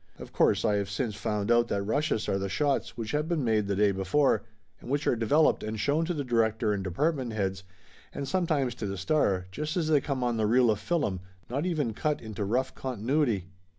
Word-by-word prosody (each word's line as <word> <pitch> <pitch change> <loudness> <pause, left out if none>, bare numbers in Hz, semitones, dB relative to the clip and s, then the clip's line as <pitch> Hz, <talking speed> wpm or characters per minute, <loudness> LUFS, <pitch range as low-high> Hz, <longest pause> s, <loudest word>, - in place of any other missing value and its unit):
Of - - -11
course - - +3
I 105 -2 +3
have 100 -1 -2
since 110 +2 -2
found 105 +1 -2
out 120 0 +4
that 100 -3 -1
rushes 115 +2 0
are 95 - 0
the 100 0 -3
shots 135 -1 0
which 110 -2 -4
have 150 +1 0
been 165 -4 0
made 110 -3 +1
the 100 - 0
day 105 +1 +3
before, 100 +5 +2 0.4
and - - -11
which 145 +2 0
are - - +3
developed 140 +8 +3
and 110 0 -4
shown 145 +9 +1
to 175 - -1
the 145 - -2
director 110 -3 +1
and 100 -2 -2
department 130 - -1
heads 95 -3 -2 0.5
and 140 - -5
sometimes 150 -6 0
to 105 - -1
the 100 0 -4
star, 100 - +1
just 150 - -3
as 160 -3 0
they 150 -3 +4
come 135 -3 -2
on 120 -1 0
the 110 -1 +1
reel 120 +1 +4
of 105 - -1
fillum, 145 - -1 0.3
not 140 +7 -1
even 150 -10 -1
cut 150 +6 -1
into 110 -2 -5
rough 125 +6 0
continuity. 120 - -1
120 Hz, 220 wpm, -28 LUFS, 105-145 Hz, 0.5 s, out